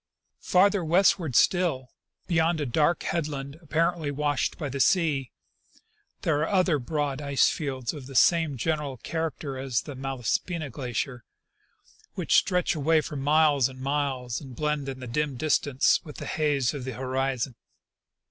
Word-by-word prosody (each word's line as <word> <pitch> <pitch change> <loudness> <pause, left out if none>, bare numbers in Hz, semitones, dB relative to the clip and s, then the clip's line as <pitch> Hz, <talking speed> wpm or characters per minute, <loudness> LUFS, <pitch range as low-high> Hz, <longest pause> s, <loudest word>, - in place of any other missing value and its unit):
Farther 195 +1 +3
westward 175 - +3
still, 160 -8 +2 0.3
beyond 165 -1 +1
a 145 - -1
dark 150 +7 +1
headland 145 -2 -3
apparently 165 0 0
washed 145 0 -1
by 150 - -3
the 140 0 -5
sea, 145 -5 +2 0.9
there 150 -3 +1
are 155 - 0
other 185 -6 +2
broad 145 +1 -2
ice 140 -2 +3
fields 130 -5 -3
of 140 -4 -9
the 135 - -10
same 160 0 +4
general 150 0 -2
character 155 -2 -4
as 130 -3 -1
the 145 - -8
Malaspina 135 +4 -2
glacier, 125 -1 -4 0.9
which - - -1
stretch 180 -1 +3
away 160 +1 +2
for 150 - -7
miles 145 -1 +3
and 130 0 -12
miles 135 -3 -2
and 130 -4 -10
blend 150 0 -1
in 130 -1 -7
the - - -6
dim 140 +2 -1
distance 145 -2 +2
with 150 - -10
the - - -7
haze 145 -4 0
of 140 -3 -5
the 130 0 -5
horizon. 130 0 -2
145 Hz, 150 wpm, -27 LUFS, 130-160 Hz, 0.9 s, same